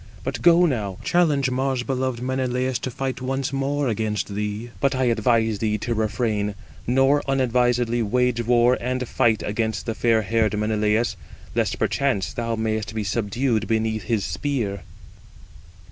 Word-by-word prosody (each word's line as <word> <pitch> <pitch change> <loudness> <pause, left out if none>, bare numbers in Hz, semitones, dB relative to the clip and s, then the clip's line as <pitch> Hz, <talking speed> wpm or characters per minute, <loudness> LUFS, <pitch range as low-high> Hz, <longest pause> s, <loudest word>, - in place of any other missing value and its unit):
But 125 -1 -4
go 175 +5 +6
now, 105 - -1
challenge 150 -7 +2
Mars 130 -1 0
beloved 130 -2 -2
Menelaus 130 -1 -1
to - - -4
fight 130 +1 -4
once 135 +1 -2
more 140 +1 0
against 105 -2 -2
thee! 105 +3 -4
But 140 0 +1
I 130 - +1
advise 115 -2 +2
thee 105 -1 0
to 120 +3 -2
refrain, 105 -1 -1 0.3
nor 135 +4 +3
unadvisedly 125 -2 +2
wage 125 +2 +1
war 120 +1 +3
and 125 +1 -2
fight 110 -2 +2
against 110 +1 -2
fair 115 -1 +1
haired 110 0 +1
Menelaus, 105 +1 +1 0.4
lest - - 0
perchance 130 -9 0
thou 115 -1 -2
mayest 110 -1 -2
be 110 - -1
subdued 110 +2 -1
beneath 110 -1 0
his 110 -4 0
spear." 120 -9 -2
120 Hz, 145 wpm, -23 LUFS, 110-130 Hz, 0.4 s, go